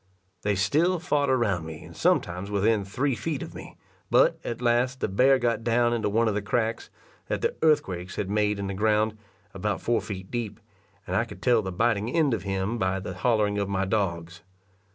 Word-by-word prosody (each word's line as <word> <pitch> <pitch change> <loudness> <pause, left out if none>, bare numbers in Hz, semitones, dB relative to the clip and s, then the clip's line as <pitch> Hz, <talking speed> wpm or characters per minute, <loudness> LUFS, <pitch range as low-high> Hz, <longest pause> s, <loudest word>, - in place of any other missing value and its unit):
They 105 -1 0
still 160 - +2
fought 150 -4 0
around 110 -10 +1
me, 80 -1 -8
and - - -12
sometimes 90 +3 0
within 105 +1 +2
three 130 +8 -1
feet 145 +3 -3
of - - -9
me; - - -10 0.3
but, - - +4
at 120 - -4
last, 125 +2 +1
the - - 0
bear 130 +7 +4
got 115 -3 0
down 120 0 +2
into 110 -3 0
one 115 +3 +2
of 110 - +1
the 105 - -1
cracks, 115 +2 -1 0.4
that - - -2
the - - +1
earthquakes 95 - +1
had 100 - -2
made 105 +1 +1
in 100 - -3
the 95 - -3
ground, 110 +2 +1 0.4
about - - -2
four 120 -1 +1
feet 95 -2 -7
deep, 120 -4 -4 0.5
and - - -3
I - - +3
could - - -11
tell 120 -3 +4
the 95 -2 -4
biting 110 +2 +1
end 150 -2 +2
of 110 - -1
him 95 +4 -2
by 95 0 0
the 95 -1 -6
hollering 105 +1 +1
of 100 -1 -1
my 100 0 0
dogs. 90 -4 -2
110 Hz, 205 wpm, -26 LUFS, 95-120 Hz, 0.5 s, but